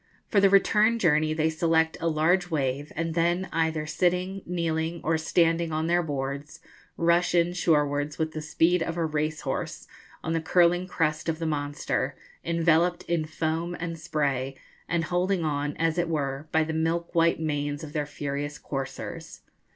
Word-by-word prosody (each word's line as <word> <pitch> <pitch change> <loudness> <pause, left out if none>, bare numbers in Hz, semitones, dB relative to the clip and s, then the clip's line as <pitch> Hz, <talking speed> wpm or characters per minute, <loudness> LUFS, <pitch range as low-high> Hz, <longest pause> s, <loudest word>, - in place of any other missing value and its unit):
For 205 - +4
the 195 - +6
return 210 +3 +4
journey 155 -6 +3
they 155 0 +1
select 160 0 +2
a 165 - 0
large 170 +3 +2
wave; 145 -2 -1
and 165 +1 -2
then, 175 +3 +1
either 160 -1 0
sitting, 180 +4 0
kneeling, 165 -1 -1
or 165 +1 +2
standing 165 +1 +2
on 155 +1 -1
their 175 +1 +3
boards, 140 -1 -4 0.4
rush 170 +1 +3
in 170 0 +3
shorewards 150 -4 +1
with 160 0 -1
the 155 - -5
speed 165 +3 +2
of 165 +1 -2
a 165 - +1
racehorse, 155 0 -3 0.4
on 165 - -1
the 165 - 0
curling 175 +2 +3
crest 155 -3 -1
of 160 - -1
the 165 - -4
monster, 145 -2 -2 0.3
enveloped 170 +1 +2
in 170 -2 -1
foarn 160 +2 -2
and 165 -1 -5
spray, 140 -5 -1 0.3
and 170 -1 +1
holding 180 +1 0
on, 145 -1 -2
as 165 +1 +1
it 175 -1 0
were, 140 -2 -2
by 160 - +3
the 160 +1 -3
milk 165 +2 -1
white 165 -1 +3
manes 145 -1 -2
of 150 -1 -8
their 150 -2 -1
furious 145 0 -4
coursers. 135 -2 -6
160 Hz, 165 wpm, -27 LUFS, 150-170 Hz, 0.4 s, the